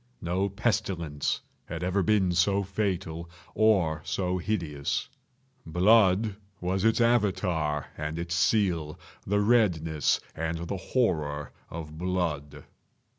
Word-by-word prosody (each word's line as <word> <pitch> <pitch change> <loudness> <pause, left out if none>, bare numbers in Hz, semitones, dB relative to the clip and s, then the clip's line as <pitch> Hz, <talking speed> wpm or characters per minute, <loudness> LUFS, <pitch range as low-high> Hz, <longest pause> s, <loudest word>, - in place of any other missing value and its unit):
No 90 +4 0
pestilence 95 -8 -1 0.2
had 85 +1 -5
ever 95 +2 +1
been 95 -2 +3
so 95 +3 +2
fatal, 90 -4 -2 0.2
or 95 -8 +3
so 90 +1 -1
hideous. 85 -7 -2 0.6
Blood 100 +3 +4 0.2
was 95 +2 -1
its 115 +1 +3
Avatar 90 - +1
and 75 +1 -4
its 85 0 -3
seal—the 90 +1 0
redness 90 - +2
and 80 +1 -2
the 100 - -2
horror 75 - -1 0.2
of 80 -1 -7
blood. 85 -6 -2
90 Hz, 105 wpm, -28 LUFS, 80-100 Hz, 0.6 s, Blood